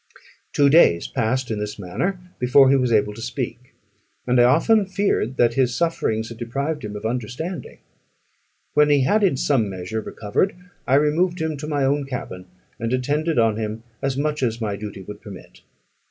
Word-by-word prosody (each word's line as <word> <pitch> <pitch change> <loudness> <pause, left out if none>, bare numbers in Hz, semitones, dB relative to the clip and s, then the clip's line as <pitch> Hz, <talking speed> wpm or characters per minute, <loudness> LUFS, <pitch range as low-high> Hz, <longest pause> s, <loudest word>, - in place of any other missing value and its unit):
Two 145 - +4
days 140 - +5
passed 125 +2 -1
in 110 - -2
this 105 0 -4
manner 140 - -3 0.2
before 130 +2 +5
he - - +5
was 125 -3 +1
able 105 -1 +2
to 115 - -10
speak; 120 +1 -5 0.5
and 125 0 +3
I - - +6
often 195 - +4
feared 190 - 0
that 120 -1 +3
his 125 -1 +1
sufferings 115 -9 -1
had 115 -1 -10
deprived 140 +6 -3
him 105 -1 -6
of 105 - -7
understanding. 125 - -4 1.0
When 150 0 +4
he 145 -2 +4
had 210 +11 +2
in 180 -9 +3
some 125 -7 +1
measure 95 +4 -4
recovered, 110 - -1 0.3
I 130 - +4
removed 165 +5 +2
him 160 -1 -1
to 150 +2 -6
my 145 -3 0
own 140 +1 0
cabin, 95 -8 -6 0.3
and 115 0 -2
attended 145 +6 0
on 115 -2 +3
him 110 0 -4 0.2
as 135 -1 -1
much 150 +1 -1
as 115 -3 0
my 105 -3 -2
duty 100 -1 -7
would 105 +2 -10
permit. 100 -3 -12
125 Hz, 185 wpm, -22 LUFS, 110-150 Hz, 1.0 s, I